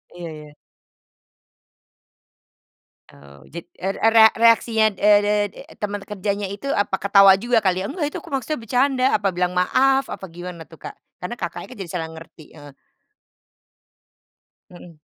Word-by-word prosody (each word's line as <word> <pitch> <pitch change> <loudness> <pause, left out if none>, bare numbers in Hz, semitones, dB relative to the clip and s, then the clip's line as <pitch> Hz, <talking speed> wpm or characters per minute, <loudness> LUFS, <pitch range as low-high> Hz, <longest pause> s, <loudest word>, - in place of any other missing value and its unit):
Iya 170 -2 -7
iya. 150 -1 -12 2.6
Eee, 70 0 -17 0.2
jad 170 - -7
er 195 +1 -3
era 225 0 +6
reaksinya, 225 -1 +3
eee 205 0 +5
eee 205 0 +1
eee, - - -13
teman 205 -1 -4
kerjanya 200 0 -4
itu 205 +8 -7
apa 200 -2 -1
ketawa 195 -1 +5
juga 235 -1 +1
kali 185 -1 +1
ya? 195 - -3
"Enggak 300 -5 -3
itu - - -6
aku - - -17
maksudnya 275 +1 -3
bercanda," 255 +3 0
apa 200 -2 0
bilang 180 0 -2
maaf, 265 +9 +2
apa 190 - -7
gimana 175 -1 -9
tuh, 160 - -15
Kak? - - -10 0.2
Karena 180 +7 -7
Kakaknya - - -6
kan 250 - -12
jadi 180 -4 -7
salah 165 -3 -4
ngerti, 160 -1 -14
heeh. 145 -3 -14 2.0
Mhm. 175 -2 -15
200 Hz, 150 wpm, -21 LUFS, 175-225 Hz, 2.6 s, era